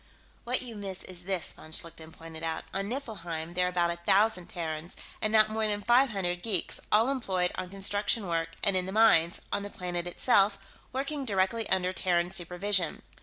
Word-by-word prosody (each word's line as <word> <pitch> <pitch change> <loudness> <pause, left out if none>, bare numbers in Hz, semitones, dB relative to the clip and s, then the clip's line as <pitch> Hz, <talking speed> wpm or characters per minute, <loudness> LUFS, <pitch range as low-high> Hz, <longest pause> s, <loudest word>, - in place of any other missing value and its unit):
"What 250 +2 +1
you 235 -3 -8
miss 195 -2 -6
is 180 -1 -6
this," 190 -3 -1
von 155 - -13
Schlichten 165 0 -4
pointed 165 0 -10
out. 160 0 -3
"On 195 +1 -2
Niflheim, 175 - -4
there 180 0 +2
are - - 0
about 175 -1 +1
a - - -8
thousand 190 +1 +2
Terrans, 160 0 -3 0.2
and 215 - 0
not 215 -1 +5
more 220 0 +1
than 205 -1 -1
five 250 +4 +5
hundred 180 -4 -2
geeks, 195 -6 0
all 225 +5 +4
employed 190 -9 0
on 180 - -5
construction 205 +2 0
work 165 -2 -1
and 200 -3 +3
in 185 0 +1
the - - -4
mines, 190 -6 +4
on - - 0
the 205 - -6
planet 175 -2 -4
itself, 200 +1 +3 0.3
working 275 +2 -3
directly 205 0 0
under 185 -1 +1
Terran 175 -1 +1
supervision. 180 0 +1
190 Hz, 190 wpm, -29 LUFS, 175-215 Hz, 0.3 s, not